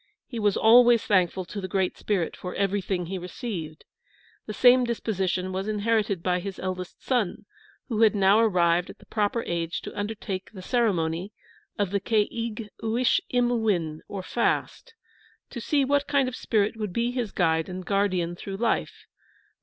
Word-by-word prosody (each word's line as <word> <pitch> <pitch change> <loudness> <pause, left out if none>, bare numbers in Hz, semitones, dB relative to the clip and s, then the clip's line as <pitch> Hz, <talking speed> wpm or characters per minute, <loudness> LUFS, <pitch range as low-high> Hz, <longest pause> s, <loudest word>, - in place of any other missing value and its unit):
He 235 - -6
was 205 -2 +2
always 235 +1 +6
thankful 185 -2 +2
to 200 +3 -6
the 185 - -4
Great 190 0 0
Spirit 190 -6 -1
for 180 - -7
everything 195 -2 -1
he 185 +2 -4
received. 175 -4 -6 0.6
The - - -4
same 250 +3 +6
disposition 190 -6 -1
was 190 +2 -3
inherited 210 -3 0
by 180 -1 +1
his 195 +1 -6
eldest 185 -1 -5
son, 240 -8 -1 0.4
who 225 -4 -1
had 220 -1 +5
now 200 +1 +5
arrived 180 -5 +3
at - - -10
the - - -19
proper 215 +2 -1
age 170 -1 -2
to - - -8
undertake 205 -2 -4
the 185 -3 -9
ceremony 185 -5 0 0.4
of 200 -3 0
the 200 - +1
Ke 210 +1 +2
ig 230 -2 -5
uish 230 +3 +2
im 245 -1 +2
o - - +2
win, 175 -9 0
or 195 -2 -6
fast, 245 - -1 0.6
to 240 - -6
see 280 +3 +2
what 285 +1 +1
kind 275 -2 +2
of 255 - -4
a - - -6
spirit 215 -1 +1
would 210 -4 -4
be 235 +3 0
his 245 -5 -3
guide 160 -1 +1
and 185 0 -6
guardian 185 -4 0
through 195 +2 -6
life. 230 +1 -1
205 Hz, 175 wpm, -26 LUFS, 185-230 Hz, 0.6 s, always